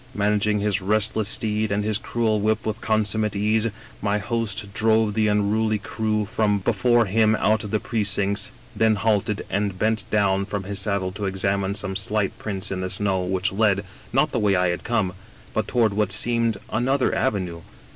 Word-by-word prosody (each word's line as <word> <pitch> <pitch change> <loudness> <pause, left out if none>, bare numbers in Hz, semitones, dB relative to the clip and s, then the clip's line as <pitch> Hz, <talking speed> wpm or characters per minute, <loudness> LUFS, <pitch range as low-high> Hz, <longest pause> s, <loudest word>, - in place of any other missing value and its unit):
" - - -23
Managing 105 0 +1
his 105 -1 0
restless 110 +2 +2
steed 110 -1 -1
and 100 +1 0
his 105 0 0
cruel 110 -2 0
whip 110 +1 0
with 110 -1 -3
consummate 110 -1 +2
ease, 105 +2 +2 0.3
my 105 0 +1
host 110 -2 -3
drove 110 0 +2
the 110 0 +2
unruly 105 +1 +1
crew 105 0 -2 0.4
before 120 +1 +3
him 110 +2 +3
out 110 0 +1
of 105 - -6
the 110 - 0
precincts, 100 -2 0 0.3
then 110 -1 +3
halted 105 -1 0
and 100 -1 -1
bent 110 +2 0
down 100 -2 +2
from 100 -1 -4
his 100 +1 -3
saddle 95 -2 -1
to 100 +2 -5
examine 95 +1 -1
some 95 -2 -3
slight 105 0 -1
prints 100 -2 -4
in 95 -1 -2
the 95 - -3
snow 95 -1 0
which 95 +1 -1
led, 100 -1 +1 0.3
not 135 +3 +2
the 125 - 0
way 105 -3 +2
I 90 0 +2
had 85 - -3
come, 105 -6 0 0.4
but 110 - -1
toward 115 -4 +2
what 105 -2 0
seemed 115 +1 +1
an 120 +3 0
other 135 -1 +2
avenue. 95 -9 -1
105 Hz, 185 wpm, -23 LUFS, 100-110 Hz, 0.4 s, before